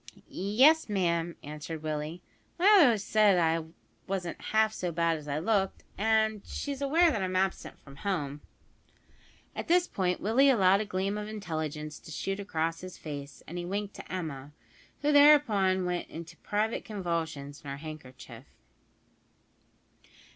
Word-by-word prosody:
"Yes, 255 Hz, -, +3 dB
ma'am," 170 Hz, -4 st, 0 dB
answered 150 Hz, +2 st, -7 dB
Willie, 155 Hz, +3 st, -4 dB, 0.3 s
"my 355 Hz, -, 0 dB
mother 405 Hz, -5 st, +8 dB
always 225 Hz, -6 st, +2 dB
said 210 Hz, -2 st, +4 dB
I 165 Hz, -1 st, +1 dB, 0.4 s
wasn't 185 Hz, -3 st, -4 dB
half 220 Hz, 0 st, +2 dB
so 180 Hz, -4 st, -3 dB
bad 165 Hz, 0 st, +1 dB
as 150 Hz, -, -12 dB
I 145 Hz, 0 st, -2 dB
looked; 195 Hz, +3 st, 0 dB
and 220 Hz, 0 st, +1 dB
she's 280 Hz, -1 st, -5 dB
aware 325 Hz, +5 st, +4 dB
that 220 Hz, -8 st, -2 dB
I'm 185 Hz, 0 st, -2 dB
absent 190 Hz, 0 st, -1 dB
from 140 Hz, -1 st, -14 dB
home." 150 Hz, -8 st, -3 dB, 1.1 s
At -, -, -5 dB
this 350 Hz, +1 st, +3 dB
point 180 Hz, -, -1 dB
Willie 250 Hz, +7 st, +4 dB
allowed 195 Hz, -5 st, +4 dB
a -, -, -3 dB
gleam 200 Hz, +1 st, -2 dB
of 210 Hz, -, -5 dB
intelligence 155 Hz, -7 st, -5 dB
to -, -, -14 dB
shoot 195 Hz, +5 st, -3 dB
across 165 Hz, -4 st, -2 dB
his 185 Hz, 0 st, -9 dB
face, 145 Hz, -2 st, -8 dB
and 175 Hz, +2 st, -5 dB
he -, -, -4 dB
winked 200 Hz, +2 st, -3 dB
to -, -, -10 dB
Emma, 150 Hz, -6 st, -5 dB, 0.5 s
who 295 Hz, -, +3 dB
thereupon 225 Hz, -11 st, +5 dB
went 180 Hz, -1 st, -2 dB
into 165 Hz, 0 st, -9 dB
private 215 Hz, +2 st, -1 dB
convulsions 165 Hz, -8 st, -4 dB
in 140 Hz, -, -8 dB
her 140 Hz, -, -5 dB
handkerchief. 130 Hz, -5 st, -10 dB
185 Hz, 155 wpm, -29 LUFS, 160-215 Hz, 1.1 s, mother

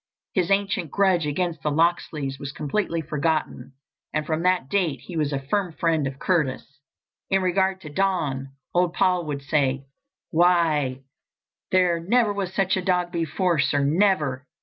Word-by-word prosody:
His 180 Hz, -3 st, +1 dB
ancient 195 Hz, -3 st, 0 dB
grudge 185 Hz, -3 st, +2 dB
against 165 Hz, +1 st, -2 dB
the 150 Hz, -, 0 dB
Locksleys 150 Hz, -3 st, 0 dB
was 140 Hz, -, -5 dB
completely 165 Hz, +3 st, -2 dB
forgotten, 155 Hz, -2 st, -2 dB, 0.4 s
and 155 Hz, -1 st, -1 dB
from 160 Hz, +1 st, -1 dB
that 180 Hz, -6 st, +2 dB
date 165 Hz, -8 st, 0 dB
he 180 Hz, -, -9 dB
was 150 Hz, -2 st, 0 dB
a 140 Hz, -, 0 dB
firm 170 Hz, +6 st, -2 dB
friend 160 Hz, -3 st, +1 dB
of 135 Hz, 0 st, -6 dB
Curtis. 145 Hz, -4 st, -1 dB, 0.5 s
In 195 Hz, 0 st, +2 dB
regard 190 Hz, +1 st, +1 dB
to 150 Hz, -, -9 dB
Don, 150 Hz, -6 st, -1 dB, 0.3 s
old 175 Hz, -1 st, +2 dB
Paul 180 Hz, -3 st, +1 dB
would 140 Hz, -2 st, -4 dB
say: 140 Hz, -2 st, 0 dB, 0.5 s
"Why, 160 Hz, -6 st, +2 dB, 0.7 s
there 180 Hz, -2 st, +3 dB
never 210 Hz, +5 st, +2 dB
was 195 Hz, -3 st, -3 dB
such 190 Hz, -1 st, +1 dB
a 190 Hz, -, -1 dB
dog 180 Hz, -1 st, 0 dB
before, 170 Hz, 0 st, 0 dB
sir, 145 Hz, 0 st, +2 dB
never! 150 Hz, -4 st, +1 dB
165 Hz, 155 wpm, -24 LUFS, 145-185 Hz, 0.7 s, there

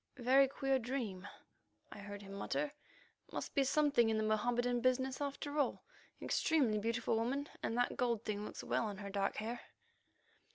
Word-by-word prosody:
"Very 265 Hz, +2 st, +5 dB
queer 270 Hz, 0 st, +1 dB
dream," 225 Hz, -6 st, -3 dB, 0.6 s
I -, -, -9 dB
heard 205 Hz, 0 st, -7 dB
him 195 Hz, 0 st, -9 dB
mutter. 285 Hz, +9 st, -2 dB, 0.6 s
"Must -, -, -4 dB
be 280 Hz, -, +4 dB
something 280 Hz, -4 st, +3 dB
in 220 Hz, -, +2 dB
the 215 Hz, -, +1 dB
Mohammedan 240 Hz, +3 st, +1 dB
business 255 Hz, +2 st, +1 dB
after 285 Hz, +1 st, -3 dB
all. 285 Hz, -, +1 dB, 0.4 s
Extremely 260 Hz, -10 st, +2 dB
beautiful 230 Hz, +1 st, 0 dB
woman, 270 Hz, +6 st, -1 dB
and 230 Hz, -, -1 dB
that 245 Hz, -, +1 dB
gold 235 Hz, -3 st, 0 dB
thing 210 Hz, -1 st, -2 dB
looks -, -, -6 dB
well -, -, 0 dB
on 205 Hz, -2 st, -5 dB
her 200 Hz, 0 st, -6 dB
dark 195 Hz, 0 st, 0 dB
hair." 230 Hz, +3 st, -3 dB
240 Hz, 165 wpm, -36 LUFS, 215-270 Hz, 0.6 s, Very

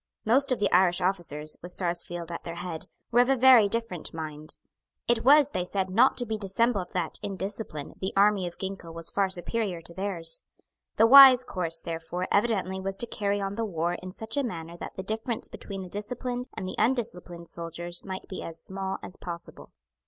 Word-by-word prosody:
Most 265 Hz, +5 st, +4 dB
of 255 Hz, -, +2 dB
the 205 Hz, -, +1 dB
Irish 180 Hz, -1 st, +4 dB
officers, 170 Hz, -5 st, -1 dB
with 175 Hz, +1 st, -10 dB
Sarsfield 175 Hz, -1 st, -3 dB
at 170 Hz, -, -5 dB
their 170 Hz, -, -6 dB
head, 170 Hz, -2 st, -6 dB, 0.2 s
were 240 Hz, -, +4 dB
of 245 Hz, +1 st, +4 dB
a 270 Hz, -, +5 dB
very 250 Hz, -5 st, +7 dB
different 220 Hz, -8 st, -3 dB
mind. 155 Hz, -1 st, -7 dB, 0.5 s
It 235 Hz, -1 st, +2 dB
was, 290 Hz, +1 st, +6 dB
they 180 Hz, -, -1 dB
said, 190 Hz, +1 st, -2 dB
not 240 Hz, +7 st, +4 dB
to 245 Hz, -, -1 dB
be 220 Hz, -1 st, -3 dB
dissembled 200 Hz, -1 st, 0 dB
that, 175 Hz, -3 st, -2 dB
in 200 Hz, -2 st, -4 dB
discipline, 190 Hz, -6 st, -5 dB
the 190 Hz, -, -1 dB
army 200 Hz, -2 st, +4 dB
of 175 Hz, -, -9 dB
Ginkell 190 Hz, -4 st, -6 dB
was 165 Hz, 0 st, -3 dB
far 195 Hz, -1 st, +1 dB
superior 190 Hz, 0 st, -2 dB
to 170 Hz, -, -11 dB
theirs. 175 Hz, -4 st, -2 dB, 0.5 s
The 225 Hz, -, +5 dB
wise 260 Hz, 0 st, +10 dB
course, 165 Hz, -6 st, -2 dB
therefore, 170 Hz, +2 st, -4 dB
evidently 200 Hz, -3 st, +1 dB
was 195 Hz, 0 st, -3 dB
to 235 Hz, -, +1 dB
carry 205 Hz, -3 st, -1 dB
on 195 Hz, 0 st, -2 dB
the 230 Hz, +2 st, -2 dB
war 175 Hz, -4 st, -1 dB
in 185 Hz, -, -7 dB
such 220 Hz, +7 st, -6 dB
a 285 Hz, -, +2 dB
manner 170 Hz, -8 st, -5 dB
that -, -, -8 dB
the 190 Hz, -, -5 dB
difference 220 Hz, +3 st, -2 dB
between 195 Hz, -2 st, -7 dB
the -, -, -8 dB
disciplined 245 Hz, +6 st, -4 dB
and 185 Hz, -, -4 dB
the 185 Hz, -, -4 dB
undisciplined 210 Hz, -8 st, -1 dB
soldier 170 Hz, +1 st, -5 dB
might 190 Hz, -1 st, -6 dB
be 185 Hz, -, -6 dB
as 165 Hz, -1 st, -7 dB
small 190 Hz, 0 st, -4 dB
as 185 Hz, -, -8 dB
possible. 170 Hz, -1 st, -8 dB
190 Hz, 200 wpm, -27 LUFS, 175-225 Hz, 0.5 s, wise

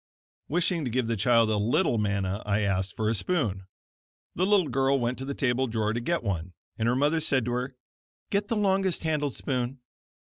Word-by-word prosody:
Wishing 170 Hz, 0 st, +1 dB
to 130 Hz, -, -2 dB
give 125 Hz, +1 st, 0 dB
the 115 Hz, 0 st, -1 dB
child 115 Hz, +1 st, +3 dB
a 105 Hz, -, +1 dB
little 110 Hz, +2 st, +2 dB
manna 100 Hz, -1 st, -1 dB
I 105 Hz, 0 st, 0 dB
asked 95 Hz, -1 st, -1 dB
for 110 Hz, -, -1 dB
a 110 Hz, -, +2 dB
spoon. 105 Hz, -, -1 dB, 0.7 s
The 185 Hz, +2 st, +1 dB
little 200 Hz, -5 st, +4 dB
girl 135 Hz, +2 st, +2 dB
went 120 Hz, +1 st, -1 dB
to 135 Hz, -, -4 dB
the 140 Hz, 0 st, -4 dB
table 130 Hz, 0 st, +1 dB
drawer 110 Hz, -2 st, -1 dB
to 120 Hz, -, -1 dB
get 170 Hz, +7 st, -1 dB
one, 90 Hz, -4 st, -3 dB, 0.2 s
and 110 Hz, -, -1 dB
her 120 Hz, -, +2 dB
mother 145 Hz, +4 st, +2 dB
said 135 Hz, -6 st, +1 dB
to 120 Hz, -, -2 dB
her: 125 Hz, +2 st, -3 dB, 0.6 s
"Get 200 Hz, 0 st, +1 dB
the 230 Hz, -, -1 dB
longest 195 Hz, -4 st, +1 dB
handled 150 Hz, -5 st, -1 dB
spoon." 130 Hz, 0 st, -2 dB
125 Hz, 200 wpm, -27 LUFS, 110-150 Hz, 0.7 s, little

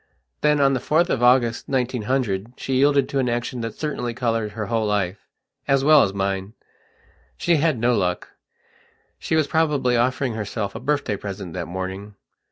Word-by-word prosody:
Then, 150 Hz, 0 st, +3 dB
on 135 Hz, -1 st, +4 dB
the 130 Hz, -, 0 dB
4th 160 Hz, +7 st, +1 dB
of 120 Hz, -, 0 dB
August, 120 Hz, -2 st, +3 dB
1900, 125 Hz, -4 st, -1 dB
she 135 Hz, -, -4 dB
yielded 140 Hz, +1 st, +3 dB
to 140 Hz, -, -1 dB
an 125 Hz, -2 st, +1 dB
action 120 Hz, +1 st, -2 dB
that 115 Hz, -1 st, -5 dB
certainly 125 Hz, -6 st, -3 dB
coloured 115 Hz, -3 st, -1 dB
her 105 Hz, -1 st, -4 dB
whole 110 Hz, +1 st, 0 dB
lifeas 105 Hz, +7 st, -2 dB
well 150 Hz, 0 st, +7 dB
as 100 Hz, -, +2 dB
mine. 95 Hz, +1 st, -2 dB, 0.8 s
She 170 Hz, -2 st, +2 dB
had 155 Hz, -2 st, +1 dB
no 120 Hz, +2 st, +2 dB
luck. 90 Hz, -3 st, -1 dB, 0.9 s
She -, -, -1 dB
was 155 Hz, -2 st, +3 dB
probably 145 Hz, -5 st, +1 dB
offering 125 Hz, +1 st, +1 dB
herself 105 Hz, -1 st, -4 dB
a 115 Hz, -, -6 dB
birthday 140 Hz, -5 st, -1 dB
present 95 Hz, -3 st, -7 dB
that 85 Hz, -3 st, -4 dB
morning.... 95 Hz, +3 st, -6 dB
120 Hz, 170 wpm, -22 LUFS, 105-135 Hz, 0.9 s, well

